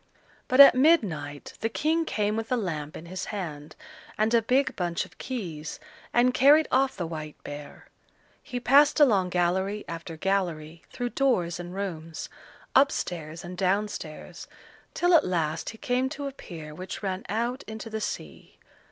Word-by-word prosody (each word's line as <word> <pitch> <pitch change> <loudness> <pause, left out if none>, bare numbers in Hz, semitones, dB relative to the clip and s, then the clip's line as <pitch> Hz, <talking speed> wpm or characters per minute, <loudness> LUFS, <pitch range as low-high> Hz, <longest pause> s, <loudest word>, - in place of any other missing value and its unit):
But 255 - +1
at 280 - +11
midnight 200 - +1
the 225 - -1
King 320 +7 0
came 210 -6 0
with 225 +1 -4
a - - +4
lamp 155 -8 -4
in 160 - -10
his 185 +2 -5
hand 160 -7 -6 0.4
and 215 +2 +1
a 235 - +5
big 255 +5 +1
bunch 175 -2 -1
of 185 +2 -20
keys, 170 - -5 0.3
and 245 +1 +3
carried 290 +5 +6
off 265 +1 +2
the 175 - -2
white 155 -2 -6
bear. 145 0 -9 0.6
He 250 -3 -5
passed 280 +5 +5
along 205 -11 +4
gallery 190 +4 0
after 165 -1 -7
gallery 170 -4 -1
through 245 0 -3
doors 185 -12 +1
and 175 +1 -7
rooms, 165 -5 -5 0.4
up 275 +1 +6
stairs 160 -1 -5
and 175 +1 -7
down 195 +3 +1
stairs, 155 -6 -8 0.5
till 350 +1 +3
at 330 - +7
last 165 -3 -1
he 225 - -9
came 255 0 0
to 285 0 -6
a 275 - -3
pier 160 - -9
which 185 +6 -7
ran 190 -1 -2
out 235 +5 -1
into 220 +1 -7
the 220 -1 -4
sea. - - -6
195 Hz, 170 wpm, -27 LUFS, 165-250 Hz, 0.6 s, at